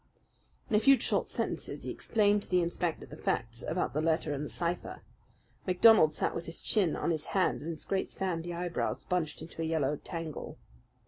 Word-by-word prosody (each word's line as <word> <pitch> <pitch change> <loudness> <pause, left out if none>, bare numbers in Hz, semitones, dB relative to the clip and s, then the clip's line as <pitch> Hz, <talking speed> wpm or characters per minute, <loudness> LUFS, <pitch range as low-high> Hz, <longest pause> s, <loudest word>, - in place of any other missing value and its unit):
In 215 - +1
a - - +6
few 270 +3 +6
short - - 0
sentences - - -3
he - - -3
explained 205 -2 +2
to - - -10
the 180 -1 +3
inspector 170 -1 -2
the - - -10
facts 115 +1 -2
about 175 +3 -1
the 150 - 0
letter 160 -2 +1
and 145 +1 -3
the 150 - -5
cipher. 175 0 -3 0.6
MacDonald 185 -3 +7
sat - - -1
with 170 - -5
his 165 - -5
chin 190 -8 +2
on - - 0
his 155 -2 -1
hands 185 - +2
and 160 - -5
his 165 - -5
great 195 -1 -1
sandy 175 -2 -3
eyebrows 175 0 -2
bunched 165 -4 -1
into 165 - -8
a - - 0
yellow 150 -3 0
tangle. 165 -2 -6
170 Hz, 195 wpm, -31 LUFS, 155-185 Hz, 0.6 s, MacDonald